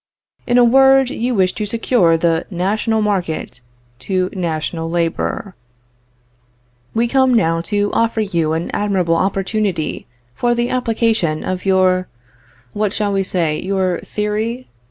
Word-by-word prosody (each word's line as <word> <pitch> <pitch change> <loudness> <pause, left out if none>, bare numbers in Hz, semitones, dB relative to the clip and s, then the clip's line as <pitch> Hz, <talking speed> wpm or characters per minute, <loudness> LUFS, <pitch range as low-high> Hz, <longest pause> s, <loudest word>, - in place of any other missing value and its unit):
In 245 0 +3
a 245 - +6
word, 270 +1 +5
you 245 -1 -1
wish 185 -2 +2
to 210 - -4
secure 205 -6 +2
the 165 0 0
national 215 +4 0
market 175 -11 -2 0.4
to 185 +6 -1
national 165 -2 -3
labor. 170 +3 -2 1.4
"We 230 +1 +2
come 260 0 +3
now 165 -6 +2
to 205 -1 0
offer 230 -1 +1
you 170 -6 0
an 165 +2 -3
admirable 190 -5 +1
opportunity 195 - -1 0.3
for 240 - 0
the 240 +1 -1
application 225 -9 0
of 185 0 -4
your 185 -1 +3 0.7
what 210 -1 -1
shall 205 -1 -1
we 195 - +1
say? 170 -5 -1
your 190 -2 -1
theory? 215 +4 -3
195 Hz, 135 wpm, -18 LUFS, 175-225 Hz, 1.4 s, a